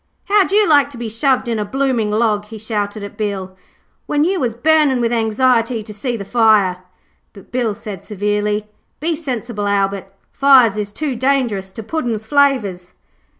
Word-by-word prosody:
'How'd 400 -2 +3
you 420 +1 +4
like 290 -3 +4
to 275 - -11
be 235 -1 -5
shoved 255 +3 +1
in 230 -2 -1
a - - 0
blooming 250 -1 0
log,' 210 -1 +1
he 220 +1 -10
shouted 210 -1 -3
at 200 - -9
Bill, 195 -3 -4 0.5
'when 295 0 +1
you 370 +3 +1
was 235 -4 -1
burning 295 0 +3
with 235 0 0
anxiety 230 0 +1
to 210 - -10
see 235 +3 -3
the 200 - -7
fire?' 210 -5 +3 0.5
but 195 - -16
Bill 240 -4 -1
said 210 -4 -8
severely, 210 0 -1 0.3
'Be 325 +2 -1
sensible, 240 -8 -4
Albert, 195 -1 -1 0.2
fires 260 -6 +5
is 205 -1 -4
too 285 +3 -3
dangerous 240 -7 0
to 225 - -7
Puddin's 230 -5 -3
flavours.' 220 -10 +1
225 Hz, 170 wpm, -18 LUFS, 205-265 Hz, 0.5 s, fires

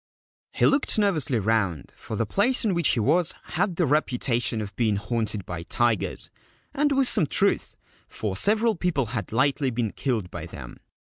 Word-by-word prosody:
He - - +1
looked 275 -4 +2
nervously 160 - +1
round, 100 -6 0
for 110 - -7
the 115 - 0
place 235 - +1
in 205 - +2
which 170 -3 +1
he 120 - 0
was 165 - +2
had 180 +1 -1
the 175 - +2
reputation 125 -5 0
of 100 -2 -6
being 110 -4 +1
haunted 105 -1 -2
by 90 -1 -5
tigers, 115 +4 -1 0.4
and 290 +1 +1
with 270 -2 +3
some 185 -11 +2
truth, 200 +7 0 0.3
for 105 -3 -4
several 220 - +2
people 165 -7 0
had 105 -7 -4
lately 135 +3 +1
been 115 -3 -2
killed 115 -9 -2
by - - -6
them. - - -10
130 Hz, 170 wpm, -25 LUFS, 110-180 Hz, 0.4 s, with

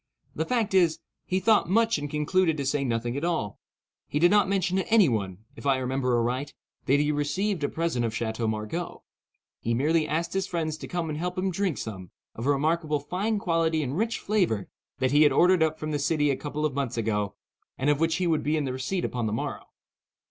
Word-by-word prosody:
The 160 - -2
fact 230 -6 0
is, 175 -4 +4 0.3
he 185 - +1
thought 215 -1 +3
much 225 -2 +3
and 145 0 -4
concluded 155 +3 +1
to 140 - -2
say 140 +1 0
nothing 120 -1 -1
at 140 - -3
all. 165 - -1 0.5
He - - -2
did 175 +4 +5
not 205 -2 +4
mention 190 -2 +1
to 190 - -1
any 220 -6 +6
one—if 110 +4 -4
I 135 -1 +4
remember 130 -1 0
aright—that 130 +3 -2
he 150 - +2
had 150 0 0
received 160 +5 -1
a 145 - +1
present 165 -7 -1
of 115 -1 -2
Chateau 110 0 -2
Margaux. 110 +11 -4 0.6
He 115 0 -1
merely 155 +5 +2
asked 165 +3 -1
his 195 0 -1
friends 160 -4 -2
to - - -8
come 175 -2 -2
and 150 - -4
help 180 +2 -3
him 190 +1 0
drink 185 -3 -1
some, 95 -5 -6 0.2
of 115 +4 -5
a - - +5
remarkable 155 +1 +1
fine 195 +9 -1
quality 165 -4 +1
and 135 +1 -3
rich 225 +5 0
flavour, 180 - 0 0.3
that 130 -2 +1
he 145 +1 +5
had 150 - +6
ordered 180 0 +4
up 160 -1 +2
from 155 0 -4
the 145 - -1
city 145 0 +2
a - - +1
couple 150 +2 -3
of 150 - -1
months 135 -3 -2
ago, 105 -3 -1 0.4
and 140 +3 +2
of 145 - 0
which 165 0 +2
he 185 - 0
would 160 -3 +2
be 155 +2 0
in 150 - -1
the 130 - -2
receipt 155 +8 -2
upon 120 -3 -2
the 105 - -2
morrow. 110 - -4
150 Hz, 225 wpm, -27 LUFS, 130-175 Hz, 0.6 s, any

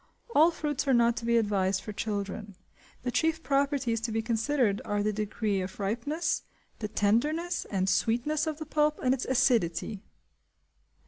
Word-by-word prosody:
All 315 +3 +6
fruits 295 -4 -2
are 265 - +4
not 235 0 +4
to 230 - -4
be 235 0 +3
advised 195 -3 +1
for 210 - -6
children; 205 -1 -4 0.5
the 250 - -1
chief 320 +6 +1
properties 275 -5 +1
to 230 0 -2
be 225 0 -1
considered 230 -1 +1
are 205 0 -1
the 215 0 0
degree 210 -1 -1
of 185 +2 -6
ripeness, 235 - -1 0.4
the 210 - -2
tenderness 295 - 0
and 190 -2 0
sweetness 245 +10 +1
of 310 -2 -2
the 310 - -6
pulp, 300 0 +1
and 255 0 +4
its 265 - -2
acidity. 215 -6 +1
235 Hz, 165 wpm, -29 LUFS, 205-290 Hz, 0.5 s, All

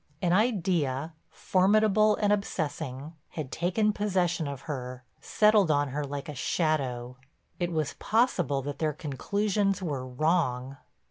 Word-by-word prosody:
An 175 0 +1
idea, 170 - +1 0.2
formidable 215 +2 +3
and 205 -1 +2
obsessing, 155 -7 -3 0.2
had 150 -5 -6
taken 195 +6 +1
possession 180 -6 0
of 140 -2 -6
her, 130 -4 -6 0.2
settled 210 -4 +4
on 145 -1 +2
her 145 +3 -3
like 140 +2 -5
a 150 - -5
shadow. 130 -5 -1 0.4
It 175 -1 -1
was 155 -3 -1
possible 180 - +1
that 145 0 -5
their 155 -1 0
conclusions 195 +7 -1
were 145 -8 -3
wrong. 135 -2 0
160 Hz, 130 wpm, -28 LUFS, 140-195 Hz, 0.4 s, settled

